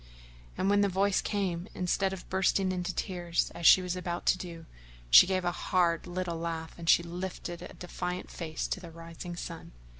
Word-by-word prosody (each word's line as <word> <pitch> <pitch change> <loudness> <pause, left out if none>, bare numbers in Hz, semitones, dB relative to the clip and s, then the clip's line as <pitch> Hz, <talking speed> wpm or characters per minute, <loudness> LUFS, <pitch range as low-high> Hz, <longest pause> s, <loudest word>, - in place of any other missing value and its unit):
And 185 - 0
when 205 0 +4
the 200 - +3
voice 195 +1 +2
came, 185 -3 -2
instead 190 +2 0
of 190 -1 -7
bursting 190 0 +1
into 180 0 -2
tears 175 -2 -1
as 170 -1 +2
she 185 - +8
was 180 0 -2
about 175 -1 -4
to - - +4
do, 170 -2 -8 0.5
she - - +10
gave 185 -1 0
a 175 - +2
hard 175 -1 +1
little 175 -1 -3
laugh 165 -1 -4
and 170 -1 -4
she 170 - +6
lifted 175 0 -6
a 180 - -9
defiant 180 0 -5
face 160 -3 -4
to - - -2
the 175 -2 -10
rising 165 +1 -8
sun. 170 - -7
180 Hz, 190 wpm, -30 LUFS, 170-185 Hz, 0.5 s, she